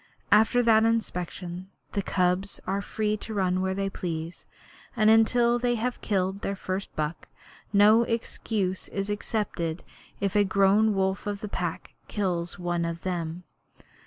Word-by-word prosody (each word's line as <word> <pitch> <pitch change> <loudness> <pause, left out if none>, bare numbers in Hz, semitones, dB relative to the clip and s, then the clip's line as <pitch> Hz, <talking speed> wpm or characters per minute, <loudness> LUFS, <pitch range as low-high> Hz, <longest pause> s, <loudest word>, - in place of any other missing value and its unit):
After 220 +4 +5
that 220 -1 +5
inspection 180 -5 -2 0.2
the 200 - -1
cubs 185 +1 0
are 195 +2 -1
free 215 +1 -1
to 220 +1 -7
run 185 -2 +1
where 190 0 -1
they 195 0 -1
please, 170 -3 -5 0.5
and 215 -2 +5
until 235 +2 +4
they 240 0 +1
have 240 +2 -2
killed 190 -1 -1
their 200 - -2
first 190 0 -4
buck 155 +1 -3 0.4
no 210 +3 +6
excuse 220 -4 -2
is 195 +1 -3
accepted 200 -6 -2 0.4
if 200 0 -1
a 205 - +5
grown 200 +2 +3
wolf 190 +1 0
of 205 -1 -3
the 210 - -4
Pack 175 -4 -4
kills 175 -4 -2
one 175 -1 -1
of 170 0 -3
them. 175 -1 -3
195 Hz, 150 wpm, -27 LUFS, 180-215 Hz, 0.5 s, no